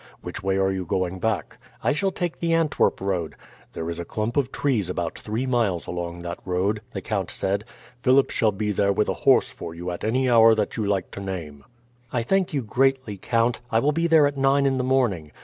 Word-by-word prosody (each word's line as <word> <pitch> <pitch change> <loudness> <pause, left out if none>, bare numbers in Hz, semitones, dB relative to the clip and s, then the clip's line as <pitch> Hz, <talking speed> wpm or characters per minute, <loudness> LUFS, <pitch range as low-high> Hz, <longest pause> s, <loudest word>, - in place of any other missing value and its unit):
"Which - - -6
way 95 0 0
are 95 0 +2
you 95 -1 -2
going 90 +1 -2
back?" 110 +3 -2 0.2
"I - - +3
shall 195 +6 0
take 175 -3 -4
the 165 -1 0
Antwerp 165 -2 +2
road." 90 -5 -2 0.4
"There 80 - -4
is 85 0 -4
a - - -3
clump 110 +6 -3
of 135 -2 +1
trees 115 -10 0
about 85 -2 -3
three 110 +4 -3
miles 115 -9 0
along 85 0 -5
that 85 0 -5
road," 95 +4 0
the - - -5
count 100 -5 -2
said. 100 +2 -2 0.3
"Philip 130 +2 +3
shall 110 - +2
be 105 +1 -2
there 100 0 +2
with 105 +2 +1
a - - +1 0.2
horse - - +5
for 85 - -8
you 90 +1 -4
at 85 - -6
any 130 +4 +1
hour 115 -2 +6
that 105 -2 -1
you 110 -3 -1
like 100 -3 -1
to - - -7
name." 85 -7 -6 0.5
"I 120 -2 0
thank 190 +8 +1
you 140 -4 -1
greatly, 130 -1 +1
count. 115 +4 0
I 115 - +2
will 140 +6 +3
be 165 +3 +1
there 160 -3 +6
at 145 0 -1
nine 135 +1 +3
in 135 -1 +1
the - - 0
morning. 120 - 0
110 Hz, 225 wpm, -24 LUFS, 95-130 Hz, 0.5 s, hour